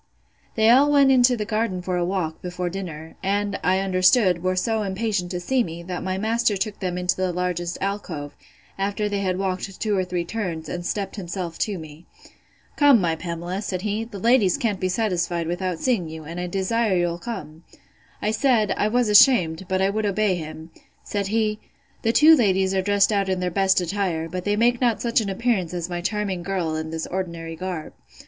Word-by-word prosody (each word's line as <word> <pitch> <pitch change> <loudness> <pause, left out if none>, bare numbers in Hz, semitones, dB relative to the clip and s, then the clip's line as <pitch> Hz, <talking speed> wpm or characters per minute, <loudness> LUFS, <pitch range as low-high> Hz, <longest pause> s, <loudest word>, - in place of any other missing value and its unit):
They 220 0 +5
all 280 +4 +5
went 280 -2 +5
into 250 -1 +4
the 210 - -2
garden 215 -3 -1
for 180 0 -2
a 175 - 0
walk, 175 -3 -2
before 180 0 -4
dinner; 165 -4 -7
and, 200 +1 -1
I 185 +1 +3
understood, 185 0 +3
were 185 +1 0
so 220 +4 0
impatient 200 -2 -2
to 180 -1 -3
see 250 +7 +1
me, 170 -3 -7
that 180 0 -5
my 185 0 -2
master 220 0 +1
took 205 +1 -3
them 180 -2 -2
into 180 0 0
the 185 -1 -1
largest 175 -1 -2
alcove, 185 -7 -4 0.4
after 200 +2 -1
they 205 -1 -2
had 185 -2 -1
walked 190 0 -3
two 210 -2 0
or 190 - +1
three 180 -1 -3
turns, 175 -6 -4
and 175 0 -4
stept 195 +3 -3
himself 175 -2 -5
to 205 -3 -1
me. 155 0 -11 0.7
Come, 285 -5 +6
my 170 -3 +1
Pamela, 175 +3 -4
said 185 -3 -4
he, 215 +1 -1
the 225 -3 -9
ladies 220 -3 +3
can't 210 -5 -1
be 185 - 0
satisfied 180 -4 -1
without 175 +1 -2
seeing 200 -7 0
you, 160 0 -8
and 165 +3 -7
I 180 - -3
desire 195 +2 0
you'll 175 -1 0
come. 175 -6 -7 0.6
I 210 - +1
said, 220 -2 +2
I 210 - +1
was 240 +2 +1
ashamed; 190 -6 +5
but 190 0 +1
I 195 - +2
would 215 0 -1
obey 205 0 +1
him. 160 -1 -7 0.3
Said 200 -1 -2
he, 215 0 0 0.4
The 225 - +2
two 305 +6 +6
young 320 - +9
ladies 190 -5 +2
are 190 - +2
dressed 200 +1 +3
out 200 -2 +1
in 185 -1 0
their 180 0 -1
best 190 +1 +3
attire; 180 -3 -2
but 180 +2 -5
they 205 0 +1
make 240 +3 +2
not 235 -3 +2
such 235 -1 +1
an 205 - -3
appearance 195 -4 -1
as 175 0 -4
my 175 0 -3
charming 200 -1 -2
girl 175 -3 -2
in 160 0 -4
this 160 0 -4
ordinary 170 -3 -4
garb. 180 -2 -5
190 Hz, 210 wpm, -23 LUFS, 175-210 Hz, 0.7 s, young